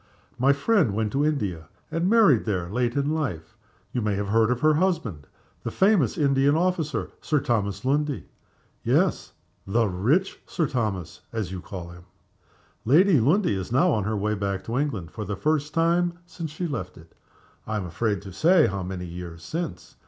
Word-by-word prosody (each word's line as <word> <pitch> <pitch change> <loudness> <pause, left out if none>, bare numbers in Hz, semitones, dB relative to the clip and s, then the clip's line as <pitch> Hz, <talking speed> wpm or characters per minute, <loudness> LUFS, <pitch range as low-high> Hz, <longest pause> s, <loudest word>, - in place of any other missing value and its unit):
My 135 +3 +5
friend 140 - +2
went 110 -1 0
to 140 +4 +1
India, 100 - -1 0.2
and 165 +3 0
married 205 - +5
there 90 -5 -2
late 120 +1 0
in 140 +1 +1
life. 100 - -3 0.4
You 125 - -1
may 105 -2 0
have 100 0 -2
heard 110 +1 +3
of 125 0 0
her 155 0 +5
husband 150 - -1 0.3
the - - -3
famous 190 - +3
Indian 140 0 +3
officer, 160 -7 0
Sir 150 - +1
Thomas 105 -4 -1
Lundie? 145 +1 0 0.6
Yes: - - +1 0.3
'the 115 +3 +2
rich 125 - +1
Sir 165 - 0
Thomas,' 105 - -3
as 110 -6 -3
you 95 -2 -5
call 90 -2 -7
him. 85 0 -13 0.8
Lady 160 - +5
Lundie 160 - +3
is 95 +1 -4
now 170 +9 +4
on 110 -7 +1
her 110 0 -1
way 105 +2 0
back 100 -2 -2
to 120 +3 -2
England, 110 - -2
for 110 - -5
the 105 0 -3
first 150 +6 0
time 170 +2 +2
since 170 -2 -6
she 160 +4 -4
left 95 - -4
it 80 0 -16 0.5
I 110 - -2
am 100 - -3
afraid 100 +4 -1
to 95 -2 -9
say 165 - +5
how 100 0 -2
many 90 0 -5
years 85 -1 -8
since. 165 - -5
120 Hz, 180 wpm, -25 LUFS, 95-155 Hz, 0.8 s, My